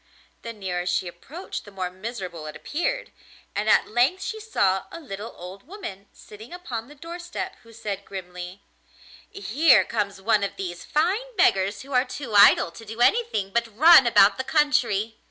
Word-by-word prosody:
The 230 - -6
nearer 180 -5 -4
she 180 +1 0
approached 280 - -8
the - - -13
more 185 -2 -4
miserable 185 -5 -7
it 155 - -8
appeared, - - -3 0.4
and 210 +1 -1
at - - +4
length 250 - +1
she 440 - -4
saw 195 - 0
a - - -8
little 215 -6 -7
old 185 +2 -10
woman 325 - -8
sitting 215 +3 -14
upon 260 -11 -6
the 295 - -14
door 335 +4 -8
step, 350 +2 -6
who 230 - -18
said 210 -3 -5
grimly: 180 0 -8 0.7
'Here 220 - +4
comes 200 -3 -3
one 210 +1 +2
of 200 - -3
these 175 -2 -6
fine 405 +11 -1
beggars 200 - +2
who 275 - -13
are 250 0 +4
too 255 -2 -7
idle 200 -4 +6
to 170 - -12
do 225 +1 -9
anything 245 - +2
but 230 -1 -2
run 315 -2 +8
about 210 0 +5
the - - 0
country! 240 -8 +1
225 Hz, 175 wpm, -24 LUFS, 195-300 Hz, 0.7 s, run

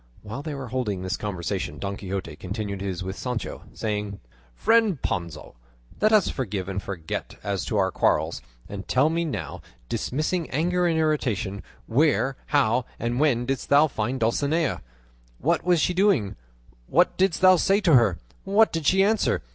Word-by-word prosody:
While 110 +6 -6
they 150 -1 -5
were 135 -3 -6
holding 110 -7 -2
this 95 0 -1
conversation 95 -6 -4
Don 100 +5 -4
Quixote 95 -5 -5
continued 100 0 -4
his 95 -2 -3
with 95 +1 -5
Sancho, 125 +4 -4
saying: 105 -2 -3 0.4
"Friend 225 - +3
Panza, 85 -8 -4 0.5
let 215 - +4
us 215 -4 +5
forgive 100 -8 -3
and 100 0 -3
forget 85 -6 -5
as 100 -2 -2
to 110 - -1
our 95 -1 +2
quarrels, - - +1 0.3
and 100 0 -7
tell 140 +5 +3
me 170 +1 0
now, 100 - -5 0.3
dismissing 155 +5 -1
anger 175 +5 +1
and 165 -1 +1
irritation, 120 - 0 0.2
where, 135 +1 +2
how, 130 -4 +2
and 120 +2 -2
when 130 -5 +2
didst 135 0 -3
thou 145 +2 +6
find 125 -2 -2
Dulcinea? 145 +7 +1 0.6
What - - +1
was 175 -1 +3
she 180 - +1
doing? 180 - +2 0.5
What 175 +5 +3
didst 185 -2 +1
thou 185 0 +8
say 195 +4 +3
to 170 -5 +3
her? 115 -9 +5 0.3
What 205 +3 +3
did 165 -3 -2
she 190 +1 +5
answer? 210 - +1
125 Hz, 165 wpm, -25 LUFS, 100-165 Hz, 0.6 s, thou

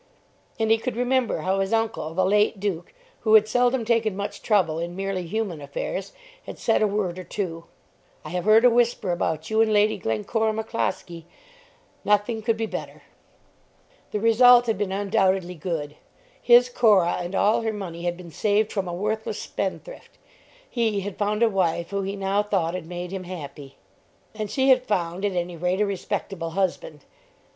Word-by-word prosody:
And 220 0 +1
he 225 - +4
could 250 +1 -4
remember 245 -6 0
how 190 +3 0
his 195 0 -1
uncle, 225 -8 -1
the 185 +1 +2
late 210 +1 +2
Duke, 190 -4 -3 0.3
who 220 -1 +4
had 215 0 +6
seldom 245 +1 +1
taken 225 -3 +1
much 200 0 -5
trouble 180 -7 +1
in 170 +1 -4
merely 195 -2 -3
human 195 -5 -3
affairs, 145 +7 -5 0.4
had - - -7
said 225 - +1
a 215 - +4
word 195 -3 -2
or - - -6
two 170 -3 -5 0.6
"I - - -6
have 180 0 -3
heard 220 +3 +6
a - - +8
whisper 235 -5 +1
about 160 0 -2
you 220 +1 +3
and 225 -1 +3
Lady 210 0 +3
Glencora 185 - -1
McCloskie; 215 -6 -3 0.8
nothing 210 +2 +1
could 225 +1 0
be 225 - -1
better." - - -7 1.1
The 210 - -2
result 240 +2 +6
had 225 -2 0
been 205 -2 -1
undoubtedly 195 -2 +1
good. 155 -3 -4 0.4
His 245 +1 +6
Cora 215 -8 +3
and 175 +2 -5
all 210 +4 +3
her 225 -1 -1
money 185 -5 -6
had 175 0 -2
been 175 -2 -11
saved 210 +6 +1
from 195 -3 -2
a 175 - -4
worthless 215 +4 -2
spendthrift. - - -6 0.5
He 225 - 0
had 200 0 -5
found 210 +2 +1
a - - +6
wife 175 -4 0
who 200 0 -1
he 195 +1 -3
now 195 +1 0
thought 190 -5 -1
had 180 -3 -5
made 175 0 -6
him 190 -1 -5
happy. 145 -6 -9 0.6
And 215 -1 -4
she 265 +4 +1
had 255 -1 +6
found 180 -2 -1
at 200 - 0
any 175 -1 -3
rate 180 +3 -1
a 210 - +3
respectable 190 -3 -4
husband. 170 -6 -2
200 Hz, 180 wpm, -24 LUFS, 175-220 Hz, 1.1 s, a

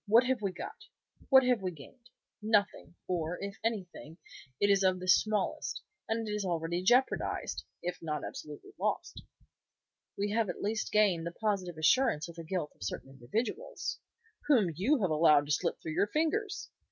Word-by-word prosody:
What 225 +4 +6
have 255 -2 0
we 200 -2 0
got? 430 - -8 0.4
What 265 -1 +8
have 250 -4 +2
we 185 - -1
gained? 210 - -14 0.3
Nothing, 205 -6 +1
or, 175 -1 -1
if 200 0 -6
anything, 185 -7 -4 0.4
it 205 0 +4
is 195 -1 +4
of 185 -1 +3
the 185 - -6
smallest, 210 +2 +1 0.3
and 225 0 -1
it - - -3
is 210 -1 -1
already 170 -1 -1
jeopardized, 245 +8 +1 0.2
if 180 +1 -3
not 155 -2 -3
absolutely 150 - -9
lost." - - -2 1.0
"We 205 +1 -1
have 220 -2 +1
at - - -5
least 215 +2 -1
gained 190 -6 +3
the - - -3
positive 185 -3 -2
assurance 155 - +3
of 170 - -9
the 165 - -7
guilt 165 -2 -3
of - - -34
certain 100 +7 -5
individuals." 225 - -3 0.5
"Whom 225 - +4
you 240 - +2
have 180 - +1
allowed 150 -2 +5
to 145 - -4
slip 170 +3 0
through 160 - -5
your 200 - +2
fingers." 325 - -1
195 Hz, 175 wpm, -31 LUFS, 170-225 Hz, 1.0 s, What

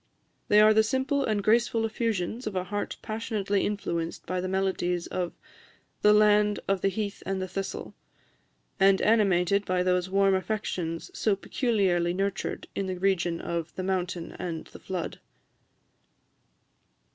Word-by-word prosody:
They 210 - +6
are 215 0 +7
the 220 - +5
simple 265 +5 0
and 215 -5 0
graceful 230 +1 +3
effusions 225 0 -2
of 210 - -4
a 185 - 0
heart 205 +3 -4
passionately 215 -2 -1
influenced 170 -5 -3
by 185 0 -2
the 185 - -2
melodies 185 -2 0
of 180 -2 -3 0.7
the 210 - +6
"land 210 0 +4
of 195 -2 +1
the - - +2
heath 200 +1 -3
and 195 0 -2
the 185 - -3
thistle," 195 +1 -5 0.9
and 195 0 +5
animated 200 -3 +3
by 185 -2 0
those 180 0 +1
warm 195 0 +3
affections 185 -4 -2
so 210 -3 +1
peculiarly 190 -6 +1
nurtured 195 0 -2
in 195 - -2
the 185 -1 -3
region 175 -3 +1
of 170 -1 -4
"the 185 - -3
mountain 180 -2 -2
and 170 -3 -4
the - - -13
flood." 180 -3 -5
195 Hz, 145 wpm, -27 LUFS, 180-210 Hz, 0.9 s, are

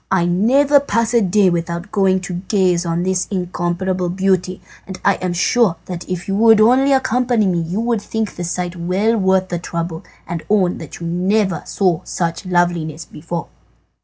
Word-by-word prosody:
I 185 -3 +2
never 260 +11 +3
pass 230 -3 -1
a 235 - +4
day 195 -1 +3
without 170 +3 -3
going 190 -2 +2
to 180 0 -6
gaze 180 -4 +1
on 170 +1 -1
this 185 0 0
incomparable 180 -1 -2
beauty, 185 0 0 0.3
and 190 -1 -8
I 200 - +3
am 185 -1 -3
sure 185 +2 +2
that 180 -1 -7
if 180 -1 -4
you 195 - -1
would 225 0 +6
only 255 +5 +4
accompany 250 -4 +2
me 180 -3 +1
you 170 +5 -3
would 230 -2 0
think 220 -1 -3
the 175 - -5
sight 175 +1 -3
well 185 +6 0
worth 190 -2 +1
the 175 - -2
trouble, 170 -1 -5 0.2
and 170 -2 -4
own 195 -4 +2
that 160 - -9
you - - -4
never 190 +3 0
saw 180 -5 0
such 170 +1 -3
loveliness 175 -3 0
before." 165 +2 -6
185 Hz, 180 wpm, -18 LUFS, 175-210 Hz, 0.3 s, would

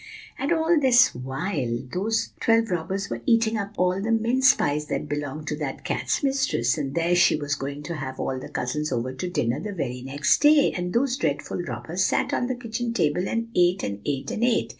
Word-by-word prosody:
"And 280 - -1
all 325 0 +3
this 255 -2 +5
while 130 0 -3 0.2
those 220 +5 -1
twelve 225 -2 +2
robbers 190 +3 -2
were - - -3
eating 230 -1 +3
up 205 0 -4
the 195 +5 +1
mince 260 +4 +5
pies 150 +1 -1
that - - -3
belonged 145 +1 -4
to 150 - -1
that 145 -3 -5
cat's - - -1
mistress, 265 - +1
and 140 -3 -4
there 170 +1 +2
she 175 - +5
was 145 -1 -2
going 140 +1 -4
to 170 +1 -5
have 130 -2 -6
all 130 -1 -2
the - - -9
cousins 150 +4 -2
over 125 +1 -2
to 175 +8 -4
dinner 125 -7 0
the 205 +5 -5
very 125 -8 -4
next 140 +3 +1
day. 295 -1 +6
And 180 0 -3
those 250 +3 +1
dreadful - - -2
robbers - - -3
sat - - +1
on 245 - 0
the 255 - -2
kitchen 235 -1 -4
table, 175 -1 +1
and 230 0 -2
ate, 180 +2 +3
and 100 0 -4
ate, 140 -2 -3
and 225 - -2
ate. 245 -1 +2
180 Hz, 205 wpm, -25 LUFS, 145-230 Hz, 0.2 s, day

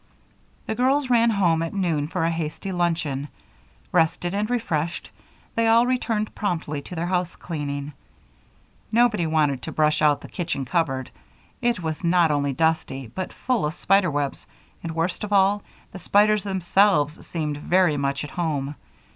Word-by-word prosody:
The - - -2
girls 260 +3 +1
ran 235 -1 +5
home 175 -7 +2
at 165 +3 -3
noon 165 -7 0
for 170 +1 -2
a 165 - +1
hasty 165 +4 -4
luncheon. 165 -6 -1 0.6
Rested 175 +1 +1
and 210 +2 -1
refreshed, 170 -10 -2 0.4
they 230 0 +1
all 230 +1 +5
returned 230 -4 -1
promptly 160 -7 -2
to 180 - -9
their 165 +1 -2
housecleaning. 155 -5 -3 1.0
Nobody 220 -7 +3
wanted 150 -4 +1
to - - -6
brush 155 0 +2
out 150 -2 +3
the - - -9
kitchen 160 -6 -3
cupboard. 135 -3 -1 0.5
It 240 -7 0
was 160 +1 -3
not 170 -2 +4
only 145 -1 +1
dusty, 135 -5 -1
but 185 - -4
full 250 -7 -1
of 150 +2 -1
spider 195 -2 +3
webs, 145 -2 -3 0.3
and 165 -1 -5
worst 170 +4 -1
of 210 - -4
all, 200 +1 +4 0.3
the 190 - -8
spiders 210 +2 +3
themselves 190 -4 +2
seemed 150 -3 -3
very 175 +1 +2
much 140 0 -1
at 145 - -7
home. 150 -5 -2
170 Hz, 155 wpm, -24 LUFS, 150-200 Hz, 1.0 s, ran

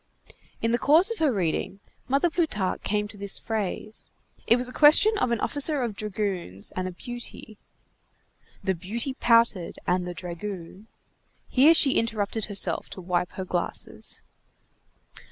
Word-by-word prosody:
In 230 - +2
the 240 - +1
course 330 +9 +5
of 460 - -5
her 310 -4 +3
reading, 190 -1 -2 0.3
Mother 280 +6 +2
Plutarque 255 - -1
came 210 0 -1
to 205 - -10
this 200 0 -2
phrase. 215 0 -4 0.4
It 235 - +6
was 250 0 0
a 250 - -5
question 315 +9 +6
of 250 - 0
an 235 - 0
officer 285 +1 +3
of 225 -4 -3
dragoons 195 - -3
and 185 0 -2
a - - -5
beauty:— 230 +1 -8 1.0
"—The 190 - +1
beauty 220 - -2
pouted, 230 -8 +2
and 180 0 0
the 175 - -6
dragoon—" 180 +2 -7 0.6
Here 295 +6 +6
she 275 -4 +5
interrupted 220 -1 -2
herself 205 -2 -2
to - - -8
wipe 180 0 -1
her 190 - -5
glasses. 175 -1 -5
215 Hz, 150 wpm, -26 LUFS, 185-250 Hz, 1.0 s, It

